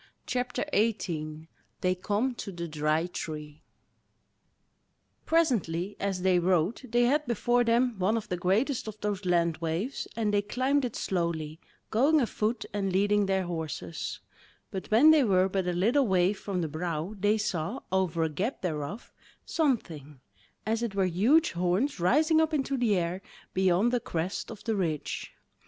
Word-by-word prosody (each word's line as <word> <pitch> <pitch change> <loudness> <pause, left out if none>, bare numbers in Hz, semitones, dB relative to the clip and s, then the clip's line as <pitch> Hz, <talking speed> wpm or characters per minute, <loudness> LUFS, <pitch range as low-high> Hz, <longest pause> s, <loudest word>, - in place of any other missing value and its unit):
CHAPTER 250 0 -2
18 160 -8 -1 0.3
They 185 0 +2
Come 210 +7 -1
to 205 - -6
the 170 -2 -5
Dry 155 +1 0
Tree 150 -4 -6 1.7
Presently 205 - +1
as 195 -2 -2
they 185 -1 +4
rode 180 +3 +1
they 240 0 +2
had 290 +4 +2
before 240 +1 +2
them 235 -1 +2
one 205 +5 +2
of 220 - -5
the 180 - -2
greatest 215 - 0
of 215 0 -7
those 205 -2 -2
land 170 -2 +2
waves, 170 - -3
and 215 -2 0
they 205 - +3
climbed 260 +6 0
it 240 - -5
slowly, 165 -4 -2 0.3
going 280 +8 +4
afoot 230 -2 -1
and 195 -2 -1
leading 205 +2 +2
their 190 -1 +1
horses; 160 - -5 0.5
but 190 - -5
when 250 +9 +7
they 310 -3 +5
were 190 -4 +3
but 190 -1 -1
a - - +1
little 230 +10 +2
way 185 0 +3
from 195 -2 -3
the 165 - -1
brow 160 +3 -3
they 205 +3 +3
saw, 200 +1 -2
over 180 -3 +1
a 160 - +1
gap 195 - -3
thereof, 160 +5 -4 0.3
something, 165 - -1 0.5
as 225 +2 0
it 230 -4 -3
were 195 -1 +2
huge 230 - +3
horns 180 +9 0
rising 310 - +4
up 320 0 +1
into 275 -1 0
the 240 -5 +2
air 175 +2 -2 0.3
beyond 190 +4 +3
the 245 - +3
crest 175 -2 -3
of 220 -3 -9
the 225 -1 -1
ridge. 165 -7 -2
195 Hz, 160 wpm, -28 LUFS, 175-235 Hz, 1.7 s, when